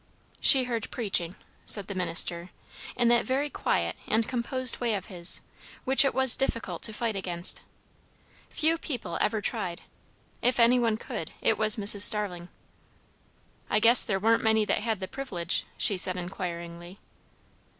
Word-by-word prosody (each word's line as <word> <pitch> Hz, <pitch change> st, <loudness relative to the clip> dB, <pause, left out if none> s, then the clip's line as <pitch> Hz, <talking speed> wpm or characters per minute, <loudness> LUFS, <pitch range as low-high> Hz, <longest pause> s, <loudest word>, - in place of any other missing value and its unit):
"She 265 Hz, -3 st, +7 dB
heard 235 Hz, -3 st, -4 dB
preaching," 190 Hz, -7 st, 0 dB, 0.3 s
said 205 Hz, -2 st, +2 dB
the 200 Hz, -, -7 dB
minister, 175 Hz, -1 st, -1 dB, 0.5 s
in 240 Hz, -1 st, +1 dB
that 240 Hz, 0 st, +3 dB
very 275 Hz, +3 st, -2 dB
quiet -, -, -2 dB
and 225 Hz, +1 st, 0 dB
composed 255 Hz, 0 st, +1 dB
way 235 Hz, -3 st, -1 dB
of 190 Hz, -2 st, -6 dB
his, 170 Hz, -1 st, -1 dB, 0.4 s
which 265 Hz, +1 st, +6 dB
it 275 Hz, -, -1 dB
was 265 Hz, -2 st, +3 dB
difficult 230 Hz, -4 st, -3 dB
to 220 Hz, -, +2 dB
fight 220 Hz, 0 st, -3 dB
against. 180 Hz, -2 st, -1 dB, 0.9 s
Few 325 Hz, +1 st, 0 dB
people 270 Hz, -9 st, -5 dB
ever 215 Hz, -1 st, -1 dB
tried; 175 Hz, -3 st, -4 dB, 0.6 s
if 250 Hz, 0 st, 0 dB
any 240 Hz, +2 st, +4 dB
one 225 Hz, -2 st, 0 dB
could, -, -, -7 dB
it -, -, +1 dB
was 215 Hz, -1 st, +2 dB
Mrs. 205 Hz, -1 st, 0 dB
Starling. 200 Hz, -5 st, +4 dB, 1.2 s
"I -, -, +1 dB
guess 230 Hz, +3 st, +6 dB
there 195 Hz, -4 st, -2 dB
warn't 225 Hz, +3 st, +2 dB
many 220 Hz, -1 st, +1 dB
that -, -, -1 dB
had 220 Hz, -2 st, -3 dB
the 190 Hz, -, -4 dB
privilege?" 185 Hz, -, -4 dB
she 200 Hz, -, +2 dB
said 185 Hz, 0 st, +1 dB
inquiringly. 175 Hz, 0 st, -7 dB
215 Hz, 155 wpm, -27 LUFS, 185-240 Hz, 1.2 s, She